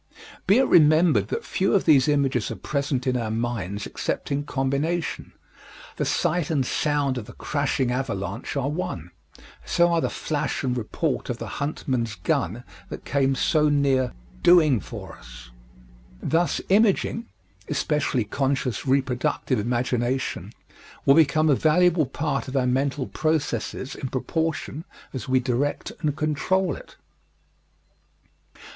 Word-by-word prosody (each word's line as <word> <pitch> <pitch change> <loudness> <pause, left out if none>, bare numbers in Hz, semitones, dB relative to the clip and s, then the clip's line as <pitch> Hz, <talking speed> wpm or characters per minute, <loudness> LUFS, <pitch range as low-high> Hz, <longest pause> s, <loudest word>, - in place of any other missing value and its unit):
Be 200 +4 +6
it 265 - +5
remembered 155 - +5
that - - -4
few 195 +2 +1
of 195 - +2
these 140 -5 +5
images 135 -5 +1
are 115 - -4
present 140 +4 -2
in 130 -1 +1
our 115 -3 -1
minds 110 -4 -3
except - - -4
in 140 +1 0
combination 145 +5 -2 0.7
the - - 0
sight 175 -2 0
and 145 -5 +1
sound 145 -2 0
of 110 - -8
the - - -12
crashing 140 -3 -1
avalanche 105 -4 -3
are 140 -1 0
one; 115 - -4 0.5
so 175 0 +3
are 165 - +2
the - - 0
flash 150 -3 -2
and 125 -2 0
report 120 -4 -2
of - - -2
the - - -6 0.2
huntman's 130 -6 -2
gun 95 +3 -1 0.3
that - - -8
came 135 -1 +1
so 150 +2 +2
near 135 -4 +2 0.3
"doing 155 -8 +5
for - - -8
us." - - -13 0.7
Thus, 170 - +1
imaging 220 +3 +2 0.4
especially 140 -5 0
conscious 135 +1 -1
reproductive 130 -1 0
imagination 120 +3 -1 0.5
will 135 - +7
become 155 0 +4
a 150 - +5
valuable 160 +1 +3
part 135 -2 -2
of 130 +1 -2
our 130 - +2
mental 135 +2 0
processes 145 -5 -2
in 135 - -5
proportion 160 +3 -2 0.3
as 130 -1 -5
we 130 0 +4
direct 130 +3 -1
and 150 -3 0
control 155 +5 0
it. - - -13
140 Hz, 140 wpm, -24 LUFS, 125-155 Hz, 0.7 s, will